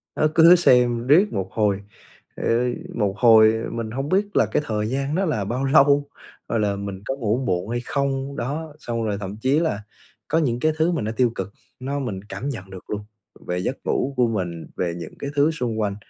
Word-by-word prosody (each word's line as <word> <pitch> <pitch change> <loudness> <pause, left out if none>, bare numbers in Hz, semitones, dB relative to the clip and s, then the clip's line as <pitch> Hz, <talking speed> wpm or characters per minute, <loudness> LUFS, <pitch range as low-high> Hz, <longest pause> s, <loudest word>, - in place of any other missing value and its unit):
Đó, 155 - +3
cứ 165 0 +8
lướt 180 - +10
xem 125 -7 +3
riết 180 +9 +5
một 95 -1 -2
hồi, 105 -3 +1 0.5
ờ, - - -7 0.5
một 105 -4 0
hồi 110 -2 +6 0.2
mình 115 -2 -4
hông 135 +4 -3
biết 200 +3 0
là - - +5
cái - - 0
thời 105 -3 -1
gian 135 +3 -1
đó 195 +2 +1
là 110 - -1
bao 120 +6 -2
lâu, 140 0 +4 0.4
hoặc 115 - -1
là 105 -2 +1
mình 100 -1 -6
có 135 - -2
ngủ 115 -4 0
muộn 90 0 -1
hay 120 +1 -1
không, 140 0 -2
đó, 145 +5 -4
xong 115 -5 -3
rồi 105 -2 -1
thậm 100 0 -6
chí 130 +6 +2
là 155 -11 -1 0.4
có - - +1
những 125 -7 +1
cái 155 +4 +2
thứ 160 +2 +2
mà 165 - -1
nó 110 +1 -2
tiêu 125 -2 +3
cực 105 - -5 0.3
nó 140 +2 -3
mình 105 -8 -4
cảm 105 +6 -5
nhận 100 -8 -6
được 95 -1 -11
luôn, 105 -1 -3 0.5
về 90 - -1
giấc 130 +9 -2
ngủ 140 - 0
của 125 -1 +4
mình, 90 -7 -3
về 85 -2 -1
những 85 -2 -8
cái 140 - -4
thứ 145 +2 +4
xung 120 -8 -3
quanh, 105 -2 -1
120 Hz, 225 wpm, -23 LUFS, 105-140 Hz, 0.5 s, lướt